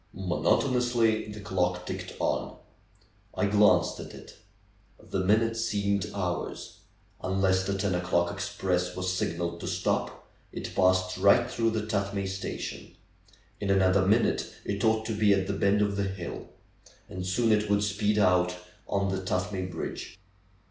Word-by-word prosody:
Monotonously 115 Hz, +4 st, +1 dB
the 105 Hz, -, -8 dB
clock 90 Hz, -2 st, -1 dB
ticked -, -, -6 dB
on. -, -, -1 dB, 0.8 s
I -, -, +1 dB
glanced 105 Hz, +1 st, +4 dB
at -, -, -8 dB
it; -, -, -13 dB, 0.6 s
the 95 Hz, -, -4 dB
minutes 115 Hz, +4 st, +2 dB
seemed 100 Hz, -3 st, 0 dB
hours. 90 Hz, -3 st, -4 dB, 0.4 s
Unless 95 Hz, 0 st, +1 dB
the 100 Hz, 0 st, -1 dB
ten 100 Hz, -1 st, 0 dB
o'clock 90 Hz, -1 st, +1 dB
express 90 Hz, -1 st, -2 dB
was 90 Hz, 0 st, -1 dB
signaled 85 Hz, -1 st, -2 dB
to -, -, -6 dB
stop -, -, -2 dB, 0.2 s
it -, -, -6 dB
passed 95 Hz, 0 st, +2 dB
right 100 Hz, +5 st, +5 dB
through 115 Hz, -2 st, 0 dB
the 110 Hz, -1 st, -2 dB
Tuth 100 Hz, -2 st, -2 dB
may 100 Hz, 0 st, -1 dB
station. 95 Hz, 0 st, -5 dB, 0.6 s
In 100 Hz, -, -3 dB
another 95 Hz, 0 st, +4 dB
minute 110 Hz, +5 st, +2 dB
it 100 Hz, +2 st, -2 dB
ought 110 Hz, -1 st, +2 dB
to 110 Hz, -, -2 dB
be 105 Hz, -1 st, +4 dB
at 95 Hz, -1 st, 0 dB
the 100 Hz, -, -2 dB
bend 100 Hz, +1 st, +2 dB
of 100 Hz, -1 st, -1 dB
the 100 Hz, -, 0 dB
hill. 95 Hz, -3 st, -6 dB, 0.6 s
And 95 Hz, -2 st, -6 dB
soon 110 Hz, +6 st, +1 dB
it 105 Hz, -1 st, +2 dB
would 105 Hz, 0 st, +2 dB
speed 105 Hz, +1 st, 0 dB
out 90 Hz, -3 st, +3 dB, 0.3 s
on 100 Hz, 0 st, 0 dB
the 95 Hz, 0 st, -2 dB
Tuthmay 95 Hz, 0 st, -2 dB
bridge. 85 Hz, +2 st, -6 dB
100 Hz, 155 wpm, -28 LUFS, 95-105 Hz, 0.8 s, right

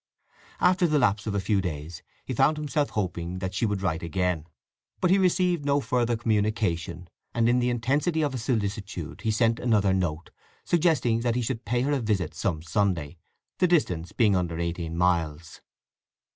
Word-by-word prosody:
After 180 Hz, -1 st, +4 dB
the 155 Hz, -2 st, +2 dB
lapse 110 Hz, -5 st, +1 dB
of 105 Hz, -, -1 dB
a -, -, +1 dB
few 100 Hz, +1 st, +1 dB
days 80 Hz, -1 st, -5 dB, 0.2 s
he 130 Hz, -, -3 dB
found 135 Hz, +5 st, +3 dB
himself 150 Hz, -1 st, -1 dB
hoping 90 Hz, -3 st, -3 dB
that 95 Hz, 0 st, -4 dB
she 110 Hz, +4 st, 0 dB
would 100 Hz, -2 st, -2 dB
write 85 Hz, -3 st, 0 dB
again. 85 Hz, -1 st, -1 dB, 0.5 s
But 180 Hz, -, +2 dB
he 195 Hz, -, +5 dB
received 180 Hz, -3 st, +2 dB
no 140 Hz, 0 st, +2 dB
further 120 Hz, -3 st, 0 dB
communication; 105 Hz, -6 st, -1 dB, 0.3 s
and 115 Hz, -1 st, +3 dB
in 120 Hz, +1 st, +3 dB
the 125 Hz, 0 st, +1 dB
intensity 140 Hz, +7 st, 0 dB
of 145 Hz, -, 0 dB
his 125 Hz, -4 st, -5 dB
solicitude 100 Hz, -, -3 dB
he 110 Hz, -, -1 dB
sent 115 Hz, +1 st, +2 dB
another 105 Hz, -5 st, +2 dB
note, 85 Hz, -4 st, -2 dB, 0.3 s
suggesting 155 Hz, -9 st, +2 dB
that 120 Hz, 0 st, 0 dB
he 125 Hz, -, 0 dB
should 115 Hz, 0 st, -3 dB
pay 120 Hz, 0 st, 0 dB
her 140 Hz, +3 st, 0 dB
a 145 Hz, -, +1 dB
visit 105 Hz, -8 st, -1 dB
some 80 Hz, -5 st, -2 dB
Sunday, 85 Hz, -3 st, -1 dB, 0.4 s
the 180 Hz, -, +4 dB
distance 90 Hz, -, +1 dB
being 105 Hz, -4 st, +3 dB
under 85 Hz, -3 st, -1 dB
eighteen 85 Hz, -1 st, -3 dB
miles. 85 Hz, -3 st, 0 dB
105 Hz, 180 wpm, -26 LUFS, 90-125 Hz, 0.5 s, he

